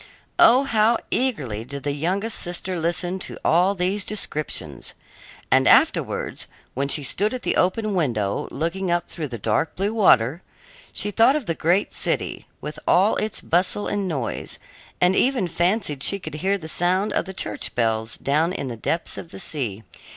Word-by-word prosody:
Oh, 255 +4 +7
how 225 -3 +3
eagerly 145 - -1
did 140 +3 -8
the 145 - -1
youngest 185 +10 -1
sister 175 +1 -2
listen 175 +3 0
to - - -7
all 180 +5 +3
these 190 +2 0
descriptions! 150 - -2 0.6
And - - +4
afterwards, - - +2 0.3
when 140 +2 -1
she 145 +1 0
stood 205 - 0
at 250 - -7
the - - 0
open 210 +3 +1
window 115 - -1
looking 170 +6 -2
up 175 0 0
through 155 -3 -5
the 120 -3 -6
dark 110 +9 0
blue 200 +3 -1
water, 160 - +4 0.5
she 205 - -1
thought 230 +6 +4
of 300 -5 -2
the 165 - -1
great 175 +5 +1
city, - - -1
with 150 +1 -6
all 195 +5 +4
its 215 0 -2
bustle 180 +4 +1
and 205 -2 -1
noise, 135 -9 -3 0.4
and 180 +1 +4
even 250 -6 +2
fancied 175 -3 0
she 200 - +3
could 185 - -8
hear 195 +2 +1
the 160 -5 -9
sound 185 +5 +1
of - - 0
the 190 - -6
church - - -1
bells 110 -1 0
down 155 +5 +1
in 140 -8 -4
the 120 - -5
depths 165 +9 -1
of 165 - -9
the - - -9
sea. 120 - -4
175 Hz, 175 wpm, -23 LUFS, 145-200 Hz, 0.6 s, Oh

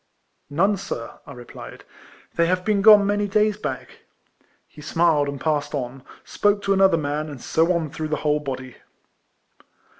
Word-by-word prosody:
" - - -48
None, 195 +8 +1
sir," 115 -10 -7
I - - -9
replied; 120 -1 -11 0.3
" - - -26
they 170 0 +2
have 180 +1 -1
been 210 -2 +1
gone 210 -1 +7
many 205 0 0
days 210 +1 +2
back." 210 - -6 0.7
He 150 - -15
smiled, 155 -2 +1
and 140 -1 -6
passing 145 -1 -1
on, 130 +1 -7 0.2
spoke 205 0 0
to 195 - +2
another 190 -3 +4
man, 150 0 -3
and 140 -3 -9
so 165 +7 +1
on 165 -4 -1
through 155 +1 -4
the 155 - -1
whole 150 0 +2
bod}'. 130 -3 -7
160 Hz, 175 wpm, -22 LUFS, 145-195 Hz, 0.7 s, gone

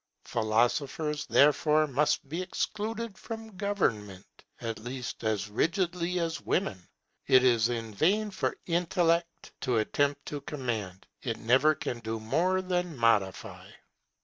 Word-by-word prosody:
Philosophers 130 +7 0
therefore 150 +2 +4
must 145 0 +1
be 165 +6 -3
excluded 215 +4 -3
from 225 -2 -8
government, 110 - -1 0.3
at 115 -2 -4
least 125 +2 -6
as 110 -1 0
rigidly 175 - 0
as 165 -1 -2
women. 105 - -1 0.4
It 130 0 +6
is 120 -2 +4
in 115 -2 -3
vain 205 - +2
for 190 - -2
intellect 170 -1 0
to 125 -3 +1
attempt 145 +6 0
to 145 -1 -5
command; 115 -10 -4 0.2
it 115 -3 -3
never 135 +7 +4
can 120 - -4
do 110 0 -4
more 180 +12 +1
than 180 -4 -2
modify. 110 -5 +1
145 Hz, 125 wpm, -29 LUFS, 115-175 Hz, 0.4 s, It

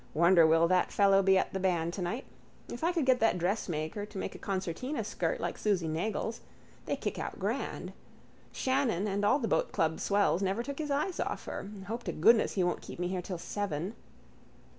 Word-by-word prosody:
Wonder 170 0 +6
will 165 +1 +4
that 180 +1 +2
fellow 195 -1 +5
be 190 0 +4
at - - 0
the 190 - -1
band 170 -3 0
tonight. 195 +8 -3 0.4
If 240 - -6
I 340 - +3
could 335 -6 0
get 260 -1 +4
that 225 -5 +3
dressmaker 175 -1 -2
to 210 - -10
make - - -3
a - - -10
concertina 195 - -3
skirt - - -2
like - - -3
Susy 195 -6 +1
Nagle's. 210 +7 -2 0.5
They - - 0
kick - - -4
out - - -4
grand. - - -3 0.6
Shannon 260 -8 0
and 200 0 -1
all 210 +7 +4
the 240 -6 -2
boatclub 160 -6 +1
swells 200 -2 +2
never 195 +4 0
took 280 +3 -6
his 305 -1 -3
eyes 300 +6 -1
off - - -3
her. 195 - -5 0.2
Hope 230 +4 -4
to 175 - -1
goodness 220 +8 +4
he 190 - +1
won't 175 - 0
keep - - -9
me 175 +1 -2
here 185 -1 -2
till 180 0 -5
seven. 185 0 -3
195 Hz, 200 wpm, -31 LUFS, 175-230 Hz, 0.6 s, Wonder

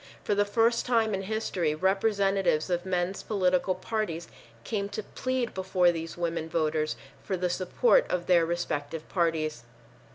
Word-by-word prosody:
For - - +1
the 205 0 +2
first 230 +3 +2
time 225 -3 +2
in 195 - -1
history 190 -6 -1
representatives 195 -2 +1
of 175 +1 -1
men's 180 +1 -1
political 185 -2 +1
parties 185 -4 -3 0.4
came 200 - -2
to 215 - -4
plead 255 +1 -2
before 185 -2 +2
these 165 0 -6
women 165 -2 -2
voters 155 -1 0 0.3
for 190 - -2
the 180 0 0
support 480 - +3
of 175 -1 -1
their 175 -2 +5
respective 165 -2 -3
parties. 160 -6 0
185 Hz, 150 wpm, -28 LUFS, 165-205 Hz, 0.4 s, their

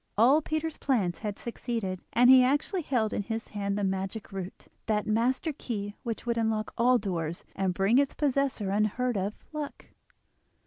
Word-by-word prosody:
All 260 +8 +6
Peter's 315 +1 -3
plans 205 -11 0
had 210 -2 -4
succeeded, 230 -6 -4
and 245 +1 +5
he 260 0 +9
actually 290 +8 +1
held 235 -8 0
in - - 0
his 225 +2 -4
hand 200 -1 -2
the 205 - -1
magic 195 +2 -3
root—that 195 +3 -4
master 245 +8 +1
key 205 -7 -4
which 230 -2 -4
would 235 -1 0
unlock 220 -1 -1
all 250 +2 +4
doors, 170 -6 -3
and 190 -1 0
bring 195 +7 +3
its 280 -1 +1
possessor 275 -8 0
unheard 215 +4 +1
of 200 +2 -1 0.2
luck. 300 -2 -6
225 Hz, 165 wpm, -29 LUFS, 200-255 Hz, 0.2 s, he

